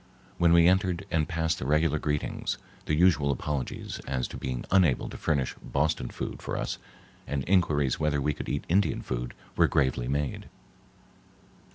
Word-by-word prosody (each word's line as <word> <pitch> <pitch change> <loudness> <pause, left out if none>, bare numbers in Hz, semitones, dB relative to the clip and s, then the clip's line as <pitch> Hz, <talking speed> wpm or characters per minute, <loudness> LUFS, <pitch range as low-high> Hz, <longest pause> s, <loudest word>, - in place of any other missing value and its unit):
When 85 -1 +5
we 85 0 +7
entered 95 0 +2
and 80 -3 +1
passed 80 -1 0
the 65 - -4
regular 75 +1 +2
greetings, 75 -1 -2 0.3
the 75 - +2
usual 75 -4 +4
apologies 70 -1 -3
as 65 -1 -1
to - - -8
being 65 -1 -4
unable 90 -9 +4
to - - -8
furnish 70 -4 0
Boston 75 -3 0
food - - -5
for - - -3
us - - -3 0.5
and 70 -2 -2
inquiries 75 -8 +2
whether 75 -2 +1
we 75 +2 0
could - - -6
eat 70 - -2
Indian 95 +4 +2
food - - -4 0.2
were - - +5
gravely 65 -3 +1
made. 70 +1 -2
75 Hz, 165 wpm, -28 LUFS, 70-85 Hz, 0.5 s, we